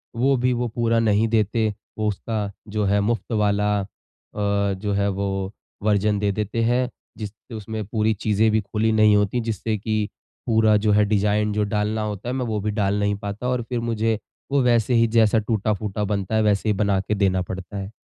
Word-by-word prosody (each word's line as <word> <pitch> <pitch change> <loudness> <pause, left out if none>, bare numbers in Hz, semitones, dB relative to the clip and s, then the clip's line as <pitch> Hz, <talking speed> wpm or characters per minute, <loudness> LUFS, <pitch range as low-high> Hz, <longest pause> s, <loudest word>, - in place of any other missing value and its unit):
वो 135 +4 +3
भी 125 +1 +1
वो 120 0 -1
पूरा 115 0 +1
नहीं 110 0 +3
देते, 110 0 +1 0.3
वो 110 0 0
उसका 105 0 -2 0.2
जो 105 0 -1
है 100 +1 +2
मुफ़्त 115 +4 -1
वाला 105 -1 +2
अ, - - -4 0.5
जो 100 0 0
है 100 0 +1
वो 95 0 -2 0.3
वर्ज़न 105 0 +2
दे 100 0 +1
देते 105 +3 -2
हैं। 125 +2 +1 0.3
जिस 105 -3 -5 0.2
उसमें 110 0 -5
पूरी 110 +1 +1
चीज़ें 110 +1 +1
भी 110 0 +2
खुली 105 +2 0
नहीं 110 -1 +5
होती 105 +4 +1
जिससे 110 0 -1
कि 110 0 -1 0.4
पूरा 110 -2 +4
जो 105 - +4
है 105 0 +4
डिज़ाइन 105 0 +1
जो 105 0 +1
डालना 105 +1 -1
होता 105 +1 -4
है, - - -2
मैं 130 -1 -1
वो 110 -2 -1
भी 105 +1 -1
डाल 100 -1 0
नहीं 100 0 +1
पाता 100 +5 -4
और 125 -1 0
फिर 125 -2 -1
मुझे 115 -2 0 0.3
वो 140 0 +3
वैसे 120 -1 +3
ही 115 0 +4
जैसा 110 -1 +4
टूटा-फूटा 105 -1 -1
बनता 100 0 -1
है 110 - +3
वैसे 105 0 +2
ही - - +3
बना 100 -1 +1
के 105 +2 -2
देना 95 -2 +2
पड़ता 95 +2 -6
है। 100 +1 -5
105 Hz, 205 wpm, -23 LUFS, 100-110 Hz, 0.5 s, नहीं